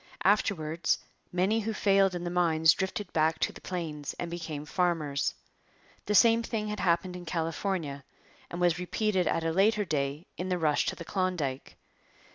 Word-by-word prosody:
Afterwards 170 -5 +2 0.3
many 190 +5 +2
who 220 0 -2
failed 195 -2 +3
in 175 - -4
the 175 - -3
mines 160 -2 +4
drifted 190 0 -4
back 160 0 +2
to - - -1
the - - -12
plains 160 -5 -4
and 170 -1 -4
became 160 -4 -5
farmers. 155 -5 0 0.7
The 210 - +1
same 230 +1 +6
thing 220 -2 -3
had 210 - -4
happened 175 +1 +1
in 180 - -7
California, 165 -3 -2 0.5
and 175 - -6
was 175 -1 +2
repeated 190 +1 0
at 165 - 0
a 165 - 0
later 205 +4 +3
day 145 0 -2
in 180 +1 -3
the 180 - +1
rush 155 -3 +1
to - - -1
the 170 - -8
Klondike. 175 -9 -2
175 Hz, 170 wpm, -29 LUFS, 160-195 Hz, 0.7 s, same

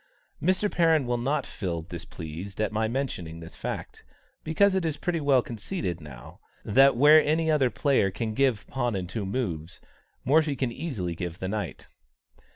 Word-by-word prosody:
Mr. 185 +3 +2
Perrin 165 -5 +3
will 120 0 0
not 140 +5 0
feel 85 -5 -4
displeased 85 +2 -8
at 110 0 0
my 110 +1 0
mentioning 110 -10 -3
this 80 0 -9
fact, - - -6 0.4
because 195 +6 +3
it 190 -1 +1
is 155 -3 -1
pretty 170 -2 -1
well 135 -4 +4
conceded 105 - -4
now, 70 -5 -11 0.3
that 135 +4 +5
where 150 +4 +8
any 160 +1 +1
other 140 -5 +3
player 135 -7 +2
can 110 +3 -3
give 130 -4 +1
pawn 120 -4 -2
and 90 -2 -3
two 100 +1 -4
moves, 90 -8 -3 0.5
Morphy 150 +1 +3
can 130 -2 -1
very - - -11
easily 105 - -3
give 85 0 -5
the 95 - -4
knight. 105 -2 -4
120 Hz, 170 wpm, -27 LUFS, 95-150 Hz, 0.5 s, where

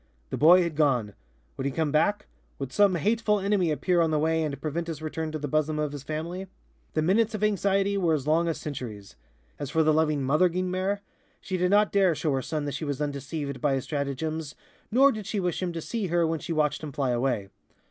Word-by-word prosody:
The - - -1
boy 175 +4 +7
had 170 -3 -3
gone. 125 -9 +1 0.4
Would 135 - -3
he - - -1
come 155 +1 -1
back? 165 +7 +2 0.3
Would 135 -2 -5
some 200 -3 +4
hateful 210 +4 +1
enemy 195 -3 +1
appear 170 +4 +1
on 165 - +2
the 155 - +1
way 160 +2 +1
and 145 -3 -3
prevent 160 +3 -3
his 165 -2 -4
return 155 0 -4
to 155 - -3
the 150 -1 -4
bosom 155 +2 0
of 150 -1 -1
his 145 -1 -6
family? 165 +6 -5 0.5
The 155 - +2
minutes 215 +6 +2
of 215 - -3
anxiety 200 -1 +2
were 165 -4 +2
as 140 -3 -4
long 165 +3 +2
as 165 - -1
centuries. 115 -9 -7 0.4
As 145 -2 -4
for 160 +3 +2
the 155 0 +4
loving 155 -2 +2
Mother 150 +7 +3
Guynemer, 185 +3 -1 0.4
she 185 - -4
did 180 0 +1
not 205 +2 +4
dare 190 -4 +3
show 150 0 -1
her 135 - 0
son 150 +2 -3
that 145 - -2
she - - -4
was 145 -3 -3
undeceived 140 -1 -4
by 140 -2 +2
his 135 - -2
stratagems, 150 +1 -3 0.3
nor 270 +5 +5
did 215 -4 -6
she 215 -1 -1
wish 180 -2 -1
him 180 -1 -1
to 165 -1 -5
see 220 +3 -3
her 170 0 +2
when 160 0 -1
she 165 - -6
watched 155 -2 +1
him 155 -2 -6
fly 135 -2 -1
away. 120 -5 0
160 Hz, 230 wpm, -27 LUFS, 145-185 Hz, 0.5 s, boy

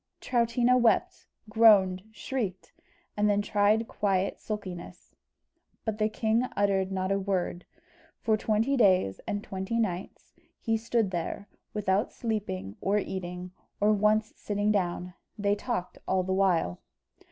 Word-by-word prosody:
Troutina 240 +1 +2
wept, 235 -2 +1 0.2
groaned, 205 -4 +5
shrieked, 215 -4 -4 0.4
and 210 0 +2
then 205 0 +3
tried 210 +2 +2
quiet 195 -2 0
sulkiness; 185 -4 -7 0.7
but 220 -1 -2
the 215 0 +2
king 220 +2 +1
uttered 195 -1 +1
not 190 0 -1
a 195 - +2
word. 185 -2 -2 0.5
For 220 - +2
twenty 220 +5 +1
days 185 - +3
and 205 0 -2
twenty 190 +4 -3
nights 190 -5 -3 0.3
he 225 - 0
stood 225 -2 0
there, 175 +3 -4 0.3
without 205 +1 +1
sleeping, 115 - -4
or 200 +2 +2
eating, 180 -2 -4 0.3
or 210 +1 +4
once 215 +1 +2
sitting 205 0 -1
down 180 -2 -1 0.2
they 200 -1 +1
talking 205 -3 -4
all 190 -1 +2
the 190 +1 -1
while. 180 - +1
205 Hz, 130 wpm, -28 LUFS, 185-220 Hz, 0.7 s, groaned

